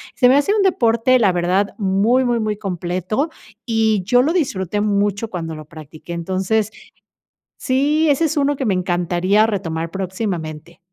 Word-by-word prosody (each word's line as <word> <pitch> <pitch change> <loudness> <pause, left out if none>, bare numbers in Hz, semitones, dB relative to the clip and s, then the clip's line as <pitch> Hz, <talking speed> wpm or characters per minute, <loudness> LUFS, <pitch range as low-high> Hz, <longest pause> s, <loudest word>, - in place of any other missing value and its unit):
Se 250 -2 +4
me 265 - +5
hace 290 +9 +2
un 415 - +2
deporte, 250 -7 +3
la 200 -5 +4
verdad, 180 +3 0
muy, 210 +6 +2
muy, 240 -1 +1
muy 215 -1 -2
completo 185 - -2 0.4
y 220 -4 +1
yo 245 +5 +3
lo 315 +6 +1
disfruté 205 - -1
mucho 205 +1 0
cuando 165 -3 -5
lo 155 -1 -9
practiqué. 155 +2 -11
Entonces 190 +5 -1 0.9
Sí, 295 +4 +2
ese 320 +3 +2
es 310 0 -2
uno 285 0 +2
que 265 - -3
me 200 - +2
encantaría 180 +3 +1
retomar 165 -6 -3
próximamente. 175 -4 -5
205 Hz, 160 wpm, -19 LUFS, 180-245 Hz, 0.9 s, me